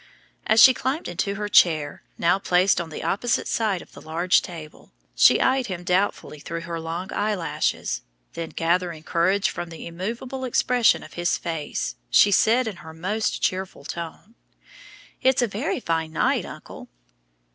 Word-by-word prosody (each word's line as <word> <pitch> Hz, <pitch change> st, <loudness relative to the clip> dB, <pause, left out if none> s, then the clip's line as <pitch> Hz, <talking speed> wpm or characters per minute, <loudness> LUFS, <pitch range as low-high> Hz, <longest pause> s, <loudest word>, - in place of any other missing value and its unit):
As 220 Hz, +1 st, +4 dB
she 260 Hz, +3 st, +9 dB
climbed 265 Hz, +6 st, -2 dB
into 200 Hz, +3 st, -2 dB
her 210 Hz, +1 st, -3 dB
chair, 155 Hz, -7 st, +3 dB, 0.2 s
now 175 Hz, +3 st, +2 dB
placed 185 Hz, 0 st, +2 dB
on 165 Hz, -, -7 dB
the 155 Hz, -, -7 dB
opposite 235 Hz, +4 st, 0 dB
side 210 Hz, -6 st, 0 dB
of -, -, -22 dB
the -, -, -13 dB
large 170 Hz, +3 st, +2 dB
table, 160 Hz, -4 st, -10 dB, 0.2 s
she -, -, +6 dB
eyed 260 Hz, -1 st, +2 dB
him 180 Hz, -2 st, -5 dB
doubtfully 180 Hz, -4 st, -1 dB
through 165 Hz, +3 st, -5 dB
her 170 Hz, 0 st, -5 dB
long 165 Hz, +3 st, -5 dB
eyelashes; 185 Hz, -, -1 dB, 0.3 s
then 165 Hz, -1 st, -5 dB
gathering 170 Hz, -1 st, -1 dB
courage 185 Hz, +5 st, +1 dB
from 175 Hz, -, -6 dB
the 165 Hz, -, -9 dB
immovable 235 Hz, +10 st, -5 dB
expression 250 Hz, -1 st, +2 dB
of 155 Hz, -, -13 dB
his 175 Hz, 0 st, 0 dB
face, 150 Hz, -, -4 dB
she 205 Hz, -, +5 dB
said 230 Hz, +5 st, +3 dB
in 205 Hz, -5 st, -5 dB
her 160 Hz, -2 st, -11 dB
most 205 Hz, +7 st, -2 dB
cheerful 185 Hz, -6 st, -2 dB
tone, 170 Hz, +7 st, -7 dB, 0.9 s
"It's 260 Hz, -1 st, +3 dB
a -, -, +1 dB
very 220 Hz, +9 st, -2 dB
fine 160 Hz, -6 st, -2 dB
night, -, -, +1 dB
uncle." -, -, -10 dB
180 Hz, 160 wpm, -24 LUFS, 165-215 Hz, 0.9 s, she